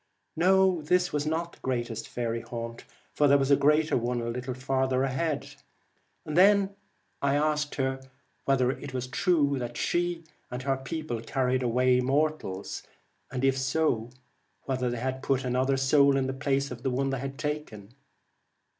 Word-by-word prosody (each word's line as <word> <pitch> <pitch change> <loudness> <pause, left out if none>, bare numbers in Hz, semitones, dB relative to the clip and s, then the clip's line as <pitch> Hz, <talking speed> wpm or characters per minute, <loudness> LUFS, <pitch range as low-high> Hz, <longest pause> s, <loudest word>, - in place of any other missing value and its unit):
No, 185 0 +4
this 180 +3 +1
was 150 0 -1
not 170 +2 -2
the - - -18
greatest 120 -3 -3
faery 115 -1 -3
haunt, 115 0 -7 0.3
for 145 - +3
there 140 0 +6
was 135 0 +1
a - - +8
greater 150 +3 +3
one 120 +1 0
a 115 0 -3
little 125 +1 -4
further 130 0 0
ahead. 135 +3 -2 0.7
I 155 - -5
then 200 +3 +5 0.5
asked 150 +1 +1
her 135 -1 -1 0.4
whether 130 -2 +3
it 135 -1 -7
was 125 -1 -2
true 145 -1 +1
that 120 -1 -5
she 175 -1 0 0.3
and 125 +1 -5
her 135 0 +1
people 135 -3 -4
carried 130 +1 0
away 125 +1 +3
mortals, 135 -7 -1 0.5
and 130 +1 -1
if 135 0 +2
so, 130 -4 0 0.5
whether 130 -2 -1
they 130 +2 -2
put 135 -1 0
another 130 +2 +1
soul 140 +1 +4
in 135 - +1
the 130 - -2
place 140 0 -1
of 120 -1 -7
the 135 - 0
one 135 +2 0
they 135 - -2
had 135 +1 -5
taken 150 -9 -5
135 Hz, 165 wpm, -28 LUFS, 125-150 Hz, 0.7 s, a